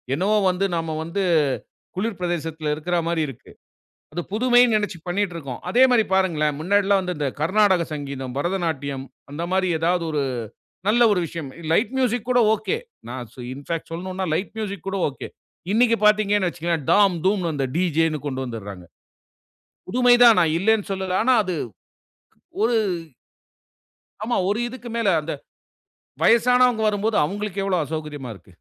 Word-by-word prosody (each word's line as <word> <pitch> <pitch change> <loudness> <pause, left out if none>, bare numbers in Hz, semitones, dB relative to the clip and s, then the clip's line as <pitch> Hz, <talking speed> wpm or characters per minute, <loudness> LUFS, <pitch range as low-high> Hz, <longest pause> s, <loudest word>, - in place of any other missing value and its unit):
என்னவோ 205 +6 +2
வந்து 185 +2 0
நாம 165 -1 -2
வந்து 190 +4 -2 0.7
குளிர் 205 0 -3
பிரதேசத்தில 160 -3 -2
இருக்குறமாரி 170 +1 -1
இருக்கு. 130 -3 -11 0.6
அது 175 - -3
புதுமைன்னு 245 0 +4
நினைச்சு 205 -4 -4
பண்ணிட்டிருக்கோம். 175 -8 -3
அதேமாரி 250 -2 +5
பாருங்களேன்! 155 -6 +1
முன்னாடிலாம் 200 +3 +2
வந்து 180 -1 -3
இந்த 145 -2 0
கர்நாடக 190 +1 +3
சங்கீதம், 135 -3 -5
பரதநாட்டியம் 145 -5 -2 0.3
அந்தமாரி 180 +5 -1
ஏதாது 170 +1 +1
ஒரு 150 -2 0 0.7
நல்ல 235 +3 +4
ஒரு 180 - +1
விஷயம். 160 -4 -6 0.2
லைட் 210 +8 +2
மியூசிக் 245 -2 0
கூட 250 - +4 0.2
ஒகே. 430 - -2 0.3
நான் 125 -2 -6
சோ 125 - -11
இன்ஃபாக் 155 +4 -5
சொல்லனுன்னா 185 +2 -4
லைட் 190 - -2
மியூசிக் 200 -4 -5
கூட 195 0 -2
ஒகே. 135 - -8 0.4
இன்னக்கி 230 +1 +4
பாத்தீங்கன்னு 205 -3 +3
வச்சுக்கவே, 170 0 -2 0.2
தாம் 200 -3 +4
தூம்ன்னு 185 -4 +1
அந்த 135 -2 -1
டிஜேனு 165 -3 +1
கொண்டு 130 -1 -3
வந்துர்றாங்க. 100 -7 -7 1.1
புதுமை 245 +4 +4
தான் 230 -5 +8
நான் 165 -3 +2
இல்லேன்னு 215 +2 +2
சொல்லலா. 190 -1 -1
ஆனா, 260 - +4
அது 185 - -3 1.1
ஒரு 230 +1 +3 1.5
ஆமா 240 +2 0
ஒரு 210 +3 0
இதுக்கு 245 0 -9
மேல 230 -4 +2
அந்த 160 - -4 0.9
வயசனவுங்க 245 0 +4
வரும்போது, 210 +1 0
அவுங்களுக்கு 200 +2 -3
எவ்ளோ 185 -3 +1
அசௌகரியமா 150 -4 -6
இருக்கு. 95 -1 -19
185 Hz, 140 wpm, -23 LUFS, 155-210 Hz, 1.5 s, தான்